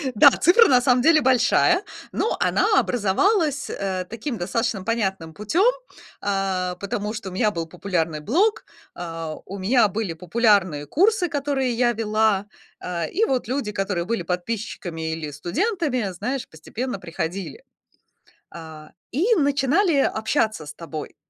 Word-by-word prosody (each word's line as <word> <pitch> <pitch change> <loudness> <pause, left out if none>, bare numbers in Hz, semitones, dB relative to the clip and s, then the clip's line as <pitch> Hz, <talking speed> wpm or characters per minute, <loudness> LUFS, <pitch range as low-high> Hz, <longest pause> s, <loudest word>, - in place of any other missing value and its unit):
Да, - - +9
цифра 420 +7 +5
на 250 -2 +5
самом 250 -1 +3
деле 315 +1 +5
большая, 260 - +3 0.3
но 450 - -1
она 425 -1 +3
образовалась, 285 - +1
э, 190 -2 -3
таким 230 +2 -5
достаточно 200 +2 -2
понятным 190 -8 -2
путём, 340 - +2 0.5
э, 190 -2 -1
потому 205 +2 -3
что 215 -4 -6
у - - -11
меня 210 +3 +1
был 165 -2 -3
популярный 170 -3 -2
блог, 375 - +1 0.3
а, 165 -2 -5
у 195 +2 -7
меня 215 +3 +3
были 205 -3 -3
популярные 180 -4 +1
курсы, 370 - +2
которые 280 -4 -1
я 240 0 +2
вела, 215 -2 +1 0.4
э, 170 -3 -3
и 445 +5 +1
вот 255 -4 -1
люди, 255 -6 -2
которые 195 -4 -2
были 225 -5 -2
подписчиками 180 -3 -4
или 155 -2 -5
студентами, 255 - -1
знаешь, 255 +8 -3
постепенно 215 +8 -6
приходили. 180 - -5 0.9
Э, 155 -2 -10 0.2
и 390 - +2
начинали 285 +5 +2 0.2
общаться 220 - 0
с 145 - -8
тобой. 155 -2 -8
215 Hz, 140 wpm, -23 LUFS, 180-270 Hz, 0.9 s, Да